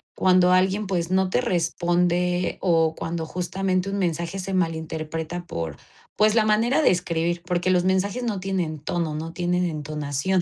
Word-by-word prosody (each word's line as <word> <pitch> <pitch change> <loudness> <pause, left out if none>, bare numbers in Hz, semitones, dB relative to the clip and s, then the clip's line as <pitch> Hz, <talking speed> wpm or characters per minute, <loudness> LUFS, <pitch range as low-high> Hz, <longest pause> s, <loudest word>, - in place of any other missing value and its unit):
cuando 185 -1 +4
alguien, 190 +3 +2
pues, 180 -2 -2
no 190 0 +2
te - - +1
responde 175 -3 0
o 165 -3 +2
cuando 165 0 -4
justamente 185 +2 -1
un 200 0 -2
mensaje 170 +1 -1
se 190 +1 -4
malinterpreta 160 0 -3
por, 80 - -5 0.4
pues, 215 +1 +4
la 225 - +5
manera 225 +7 +2
de - - +5
escribir, 170 -1 -1
porque 180 0 0
los 180 -1 +3
mensajes 200 +6 0
no 210 -5 -2
tienen 180 -5 -2
tono, 160 +1 -2
no 160 +2 -5
tienen 180 +1 0
entonación. 155 +2 -1
180 Hz, 160 wpm, -24 LUFS, 165-190 Hz, 0.4 s, la